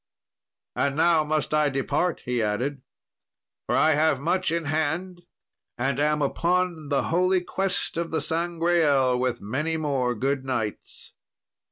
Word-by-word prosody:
"And 140 -1 0
now 165 0 +4
must 155 0 -1
I 150 -1 +3
depart," 140 +5 -1
he 125 -1 0
added, 125 +6 -2 0.9
"for - - +1
I 160 - +4
have 150 -2 +2
much 175 +4 0
in 170 -1 -1
hand, 160 +4 -2 0.6
and 135 +2 -1
am 150 0 +1
upon 170 +1 0
the 140 -2 +1
holy 185 +1 +3
quest 190 -1 -2
of 170 0 -2
the 160 - -1
Sangreal, 165 -6 +1
with 125 -1 -1
many 150 +10 -2
more 135 -5 -1
good 135 +4 -1
knights." 115 -5 -4
150 Hz, 140 wpm, -25 LUFS, 135-170 Hz, 0.9 s, now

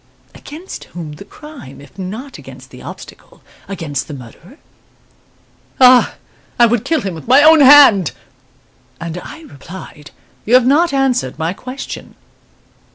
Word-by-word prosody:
Against 325 +6 -11
whom 165 -3 -9
the 150 - -11
crime, 295 - -13
if 145 +6 -17
not 220 +9 -7
against - - -14
the - - -13
obstacle, - - -13 0.2
against 165 -8 -5
the 150 - -8
murderer? 140 - -14 1.2
'Ah, 255 -1 +5 0.4
I 240 - +6
would 235 -1 0
kill 325 -1 0
him 195 -2 -4
with 160 +3 -11
my 265 +4 +5
own 315 +1 +7
hand!' 265 - +7 0.9
And 170 +1 -6
I 320 - -11
replied, 170 - -12 0.3
'You 235 - +2
have 255 -1 +5
not 315 +6 +2
answered 255 - -1
my 160 +3 -2
question. 255 +6 -9
230 Hz, 140 wpm, -16 LUFS, -, 1.2 s, own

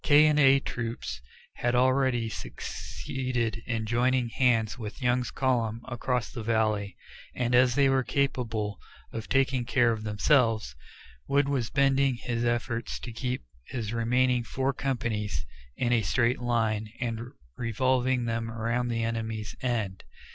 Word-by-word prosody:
K 150 +1 +6
and 150 -1 +4
A 135 -1 +6
Troops 115 - -4 0.4
had 120 0 +1
already 130 -2 +3
succeeded 120 0 -4
in 115 -2 -1
joining 120 +2 +2
hands 115 -3 +2
with 110 -2 -6
Young's 125 -1 +1
column 120 -4 0
across 125 0 -2
the 120 - -6
valley, 110 -3 0 0.4
and 120 -1 0
as 125 0 +5
they 140 -1 +5
were 135 0 +3
capable 115 -7 -1 0.3
of 110 - -5
taking 135 -2 +2
care 120 0 +3
of 110 -1 -2
themselves, 110 - +2 0.5
Wood 140 0 +3
was 130 -5 0
bending 140 -1 +3
his 120 0 -3
efforts 120 0 -1
to 120 - -7
keep 125 +2 -3 0.2
his 115 -3 -4
remaining 125 +2 +2
four 135 +3 -1
companies 110 - -2 0.3
in 120 -1 +1
a 115 - +4
straight 120 +5 +1
line 110 -3 0
and 115 -2 -2 0.3
revolving 125 +2 +1
them 115 0 -2
around 115 +2 -1
the 115 -1 -1
enemy's 110 -2 -3
"end." 110 -7 -2
120 Hz, 140 wpm, -28 LUFS, 115-130 Hz, 0.5 s, K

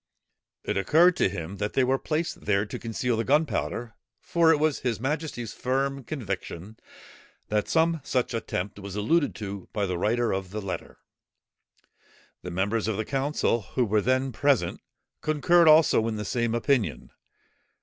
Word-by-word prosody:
It - - -2
occurred 165 - +5
to - - +3
him, 90 0 -6
that 105 +1 -3
they 135 - +3
were 130 +1 +1
placed 160 +2 -3
there 105 0 +2
to 105 - -7
conceal 115 +1 -2
the 115 - 0
gunpowder, 135 -4 0 0.3
for 170 -1 +3
it 160 - +4
was 155 -1 +1
his 120 -4 -2
majesty's 135 -4 -3
firm 135 +2 -1
conviction, 105 - -6 0.7
that 105 0 0
some 165 -1 +2
such 130 -2 -1
attempt 105 -3 -3
was 100 -1 -7
alluded 145 +10 +1
to 100 -3 -7
by 105 -2 0
the 90 -2 -2
writer 115 +4 +1
of 95 -1 -3
the 105 +3 -5
letter. 100 -2 -6 1.4
The 90 - -6
members 100 +5 -1
of 110 -3 -1
the 110 - -2
council 135 -3 0
who 120 +6 -1
were 105 0 +2
then 130 +3 +1
present, 140 +2 +1 0.4
concurred 165 +3 +3
also 155 -7 +6
in 110 - -2
the 105 0 -4
same 120 +3 0
opinion. 120 - 0
115 Hz, 160 wpm, -26 LUFS, 105-140 Hz, 1.4 s, also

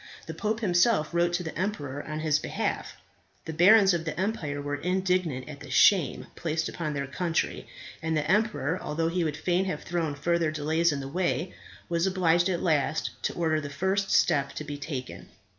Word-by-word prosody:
The - - -6
pope 220 +1 -2
himself 175 -3 +2
wrote 170 0 +2
to 175 +1 0
the 160 - -6
emperor 145 -8 -3
on 155 0 -5
his 155 -2 +2
behalf. - - -3 0.5
The 160 - -5
barons 195 +4 +6
of 170 -1 -1
the 165 +1 -4
empire 185 -8 -2
were 145 0 -3
indignant 180 -6 0
at 150 -2 -9
the - - -11
shame 185 -8 +4
placed 160 -1 -2
upon 155 -3 -4
their 140 0 -2
country; 165 +4 -2 0.3
and 160 0 0
the 150 -1 -1
emperor, 190 -4 +1
although 165 +2 -1
he 175 +1 0
would 150 -2 -2
fain 180 +3 +1
have 185 - -3
thrown 165 -4 -2
further 170 +2 +1
delays 155 +2 +1
in 140 -1 -3
the 135 - -6
way, 180 +3 -1 0.3
was 170 +2 +1
obliged 175 -1 +2
at 175 -1 -1
last 155 -2 +1
to - - -1
order 160 -2 0
the 145 - -6
first 190 +7 0
step 140 -4 +2
to - - -5
be 145 -1 -6
taken. 140 -4 -6
165 Hz, 195 wpm, -27 LUFS, 150-180 Hz, 0.5 s, barons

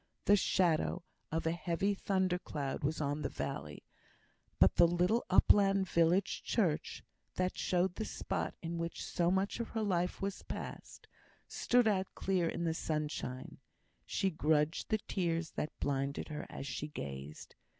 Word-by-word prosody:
The 205 - +7
shadow 180 -2 +2 0.3
of 160 +1 -1
a 160 - +2
heavy 175 +3 0
thunder 190 -2 0
cloud 140 -6 -4
was 150 +2 0
on 145 0 -1
the - - -1
valley, 75 +1 -5 0.7
but - - +5
the 170 - +8
little 180 +7 +2
upland 195 0 +5
village 170 +3 +2
church 170 -9 0 0.3
(that 185 0 0
showed 180 0 +1
the 220 +3 -4
spot - - -3
in 170 0 -3
which 170 0 -4
so 170 -1 +1
much 190 +4 0
of 235 - -2
her 225 -1 -2
life 180 -3 0
had 195 0 -2
passed) - - -7 0.4
stood 245 -1 +2
out 190 -3 +2
clear 185 -3 +1
in 170 - -3
the 165 -1 +1
sunshine. 150 -5 -3 0.5
She 195 - 0
grudged 155 0 +1
the 215 - +3
tears 170 -5 -2
that 150 - -4
blinded 140 +1 -1
her 150 -1 -5
as - - -6
she 145 +2 -4
gazed. 70 - -7
170 Hz, 155 wpm, -34 LUFS, 150-190 Hz, 0.7 s, the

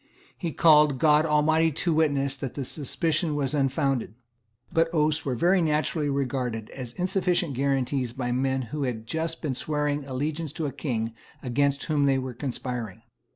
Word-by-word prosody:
He 170 -3 -3
called 150 -4 +5
God 150 +2 +4
Almighty 155 +2 +3
to 165 +3 0
witness 140 -3 +1
that 135 -2 -5
the 140 - -3
suspicion 155 +3 -1
was 140 -1 -1
unfounded. 135 -5 0 0.6
But 165 -1 +3
oaths 155 -1 +1
were 130 -3 -1
very 180 +8 +3
naturally 150 -1 0
regarded 125 -5 -2
as 125 -3 -7
insufficient 180 -3 0
guarantees 135 -1 0
by 125 0 -3
men 130 +1 0
who 150 - -2
had 120 -5 -2
just 160 +7 -3
been 145 -4 -1
swearing 150 +1 -1
allegiance 145 +3 -3
to 160 - -3
a 140 - -2
King 115 -5 -3 0.3
against 140 +2 +1
whom 150 -2 +1
they 135 -1 +3
were 130 -1 -4
conspiring. 120 -5 -5
140 Hz, 160 wpm, -26 LUFS, 130-155 Hz, 0.6 s, called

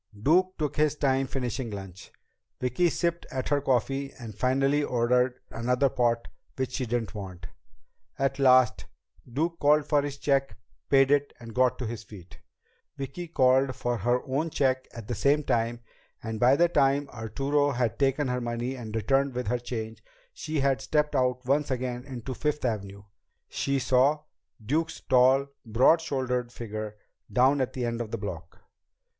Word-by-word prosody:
Duke 180 - +3
took 150 -3 -2
his 150 -1 +2
time 135 -2 +1
finishing 125 -2 -3
lunch. 95 -3 -9 0.5
Vicki 125 +8 +1
sipped 170 0 -2
at 130 -1 -3
her 145 -1 +2
coffee 135 +1 0
and 115 -3 -8
finally 135 +6 +1
ordered 125 0 +1
another 125 +4 +1
pot 120 -2 0 0.3
which 130 -1 -2
she 130 -2 -3
didn't 115 -2 -2
want. 95 -5 -8 0.7
At 135 0 0
last, 130 -3 +4 0.5
Duke 165 +6 -1
called 150 +1 +4
for 145 -2 +2
his 145 0 -5
check, 140 -1 0 0.3
paid 135 0 +5
it, 145 0 +2
and 115 -2 -10
got 125 0 +2
to 125 - -4
his 115 -1 -5
feet. 100 -5 -13 0.6
Vicki 140 +6 -6
called 130 -3 +3
for 120 0 -1
her 120 +4 +1
own 140 +5 -1
check 130 -3 0
at 115 -3 -9
the 120 - -2
same 140 +7 +2
time, 115 -1 0 0.4
and 110 -1 -4
by 125 +4 +5
the 175 +3 +4
time 140 -3 +2
Arturo 135 +6 0
had 125 -4 -1
taken 135 +1 +2
her 125 0 -1
money 120 +2 -3
and 115 -4 -7
returned 135 +4 +1
with 125 0 -2
her 125 - 0
change, 110 -3 -5
and 110 - -33 0.2
she 155 -2 -3
had 135 -1 +1
stepped 150 +2 0
out 125 -1 +1
once 140 +3 +1
again 125 -1 -3
into 130 -1 -6
Fifth 150 0 -2
Avenue, 100 -4 -3 0.4
she 140 0 -1
saw 135 +4 +2 0.4
Duke's 160 +7 -1
tall, 130 +2 +4
broad 125 +9 +4
shouldered 125 -5 -2
figure 110 -2 -6 0.3
down 135 +3 +4
at 130 - -2
the 125 -2 -2
end 115 0 -2
of 115 - -5
the 115 - -3
block. 90 -5 -7
130 Hz, 170 wpm, -27 LUFS, 120-140 Hz, 0.7 s, paid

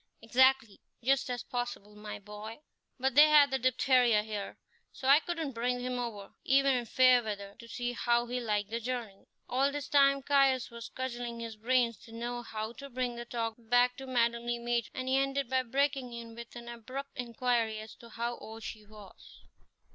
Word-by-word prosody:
"Exactly, 260 -2 +3 0.2
just 270 +1 +2
as 245 -1 -3
possible, 245 -5 -5
my 210 0 -7
boy; 210 +4 -9 0.4
but 265 +1 +1
they 300 +3 +8
had 290 -2 +6
the 265 - 0
diphtheria 250 -3 +3
here, 210 -2 -5 0.3
so 265 - -6
I 280 +2 +8
couldn't 325 -3 -3
bring 245 +1 -1
him 250 0 -3
over, 215 -5 -6
even 275 +1 +4
in 245 -2 -1
fair 255 +1 +5
weather, 200 -3 -5
to 235 - -11
see 245 +1 -3
how 240 0 +1
he 245 +1 -3
liked 210 -3 -1
the 230 - -1
journey." 235 -4 -5 0.2
All 270 +3 +2
this 290 -1 -4
time 275 -2 +4
Caius 270 -3 +3
was 235 0 -8
cudgelling 240 -2 -5
his 230 -1 -6
brains 235 0 +1
to 230 - -15
know 240 +1 -4
how 220 -1 -5
to 280 - -8
bring 250 -1 -2
the 240 0 -6
talk 230 -1 -2
back 245 +2 +3
to 270 - -8
Madame 235 -1 +1
Le 240 - +1
Maître, 235 -1 -1
and 255 0 -4
he 260 +1 +3
ended 275 -1 0
by 260 0 +3
breaking 265 0 -1
in 230 -1 -8
with 235 +1 -10
an 235 0 -9
abrupt 255 +4 -7
inquiry 235 -2 0
as 215 0 -8
to 235 - -14
how 235 +2 -4
old 225 0 -10
she 215 -1 -7
was. 210 -2 -15
240 Hz, 195 wpm, -31 LUFS, 230-260 Hz, 0.4 s, they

